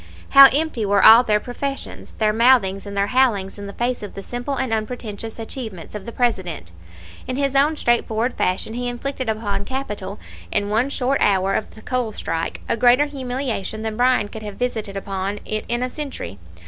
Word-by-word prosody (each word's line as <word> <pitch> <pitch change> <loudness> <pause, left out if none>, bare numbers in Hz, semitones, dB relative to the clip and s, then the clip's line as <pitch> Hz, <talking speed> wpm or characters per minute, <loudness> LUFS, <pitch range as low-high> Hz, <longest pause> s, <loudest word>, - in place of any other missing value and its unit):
How 275 -1 +10
empty 290 -5 0
were 200 0 +3
all 225 +2 +10
their 210 -3 +2
professions, 275 +4 -6
their 215 -1 +2
mouthings 220 -5 +3
and 200 0 -6
their 200 - +3
howlings 210 -7 +2
in 200 - -6
the 200 - -8
face 245 +3 -1
of 205 - -8
the 195 - -7
simple 245 +5 -4
and 260 -4 -1
unpretentious 220 -1 -4
achievements 225 -6 -7
of 210 +1 -7
the - - -4
President! 185 - -1 0.6
In 255 - -2
his 275 0 0
own 295 +3 +4
straightforward 240 -1 +1
fashion 185 +4 -1
he 245 +1 -3
inflicted 260 0 -4
upon 205 -2 -2
capital 210 -6 -5 0.3
in 205 -1 0
one 225 +6 +1
short 275 0 0
hour 195 -1 +3
of 215 - -3
the 220 - -14
coal 250 -4 -2
strike 165 -4 -3
a - - +1
greater 245 +5 +5
humiliation 250 -6 -4
than 220 -1 -3
Bryan 245 -2 +3
could 220 +1 -9
have 210 -2 -7
visited 220 -5 -3
upon 195 +1 -3
it 215 0 -3
in 240 +1 0
a 255 - -1
century. 275 - -6
225 Hz, 190 wpm, -21 LUFS, 205-255 Hz, 0.6 s, How